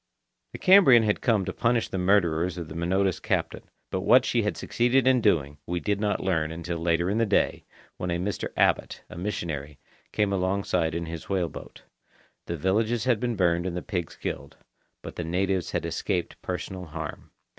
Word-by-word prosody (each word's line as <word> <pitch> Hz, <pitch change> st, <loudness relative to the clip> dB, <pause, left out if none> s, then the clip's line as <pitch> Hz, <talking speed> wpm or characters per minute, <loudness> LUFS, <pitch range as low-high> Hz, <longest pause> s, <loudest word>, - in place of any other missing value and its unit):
The -, -, -5 dB
Cambrian 185 Hz, -, +7 dB
had 105 Hz, -1 st, 0 dB
come 110 Hz, -6 st, +2 dB
to -, -, -4 dB
punish 115 Hz, 0 st, +1 dB
the 95 Hz, -, -3 dB
murderers 90 Hz, -2 st, +2 dB
of 85 Hz, -2 st, -5 dB
the -, -, -7 dB
Minota's 95 Hz, +3 st, 0 dB
captain, -, -, -2 dB, 0.2 s
but 95 Hz, -, -1 dB
what 120 Hz, +7 st, +5 dB
she 120 Hz, -, +1 dB
had 105 Hz, -1 st, -2 dB
succeeded 125 Hz, +2 st, +1 dB
in 130 Hz, -2 st, +4 dB
doing 75 Hz, -9 st, +1 dB
we 90 Hz, 0 st, -1 dB
did 100 Hz, +2 st, -1 dB
not 105 Hz, -1 st, 0 dB
learn 80 Hz, -4 st, 0 dB
until 85 Hz, +1 st, -4 dB
later 85 Hz, +1 st, +1 dB
in 105 Hz, +4 st, 0 dB
the 115 Hz, -, +3 dB
day, 100 Hz, -, +1 dB, 0.3 s
when 90 Hz, -, -3 dB
a 85 Hz, -, 0 dB
Mr. 95 Hz, +4 st, -3 dB
Abbot, -, -, +1 dB
a -, -, -8 dB
missionary, 80 Hz, -6 st, -4 dB, 0.3 s
came 105 Hz, -2 st, +1 dB
alongside 90 Hz, -3 st, 0 dB
in 85 Hz, 0 st, -2 dB
his 80 Hz, 0 st, -7 dB
whale 95 Hz, -4 st, 0 dB
boat. -, -, -11 dB, 0.6 s
The 85 Hz, -, -3 dB
villages 110 Hz, +7 st, +1 dB
had 125 Hz, -4 st, +2 dB
been 120 Hz, -1 st, -1 dB
burned 85 Hz, -2 st, +1 dB
and 90 Hz, -1 st, -3 dB
the 90 Hz, -, -4 dB
pigs 90 Hz, -5 st, -4 dB
killed. -, -, -6 dB, 0.5 s
But -, -, -9 dB
the 85 Hz, -, -2 dB
natives 90 Hz, +2 st, -1 dB
had -, -, -2 dB
escaped 90 Hz, -2 st, -3 dB
personal 90 Hz, 0 st, -5 dB
harm. 80 Hz, -2 st, -7 dB
95 Hz, 190 wpm, -26 LUFS, 85-105 Hz, 0.6 s, Cambrian